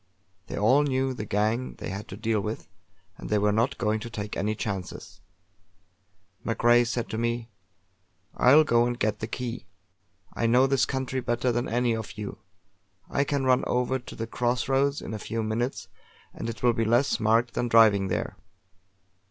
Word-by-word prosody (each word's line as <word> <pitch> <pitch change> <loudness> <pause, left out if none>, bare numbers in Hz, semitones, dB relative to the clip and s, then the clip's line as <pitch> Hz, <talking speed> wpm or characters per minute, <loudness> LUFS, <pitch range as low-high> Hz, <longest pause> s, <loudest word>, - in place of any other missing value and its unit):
They - - -6
all 125 +8 +4
knew 135 -2 0
the 110 -4 -5
gang 110 +5 0
they - - -6
had 100 +2 -6
to 95 - -8
deal 110 -1 0
with, 105 +2 -5 0.5
and - - -7
they 105 - +2
were 105 0 +2
not 115 +5 +1
going 110 -1 0
to 115 - -7
take 105 -2 -5
any 105 +2 -1
chances. 100 -1 -6 1.2
MacRae 120 +1 +3
said 120 0 -2
to 110 - -3
me: 115 0 -2 0.8
"I'll 145 +5 +6
go 120 -4 +3
and 120 0 -3
get 110 -2 -1
the 110 - -4
key! 120 -2 -5 0.7
I 115 - 0
know 125 +3 +5
this 135 -1 +2
country 130 -1 -2
better 120 0 0
than 120 +1 -1
any 120 0 +1
of 110 -1 -7
you; 105 -1 -6 0.7
I 140 - +2
can 140 -1 -1
run 130 0 +3
over 125 +1 0
to 125 - -11
the 115 - -4
cross 120 +1 -1
roads 140 +1 +1
in - - -6
a 110 - -4
few 115 +2 -3
minutes 115 +4 -2 0.5
and 115 - -5
it 115 0 -8
will 120 -1 +4
be 115 0 0
less 120 +5 +2
marked 115 +2 +2
than 120 - -1
driving 110 -4 +5
there." 90 - -3
115 Hz, 185 wpm, -27 LUFS, 110-125 Hz, 1.2 s, I'll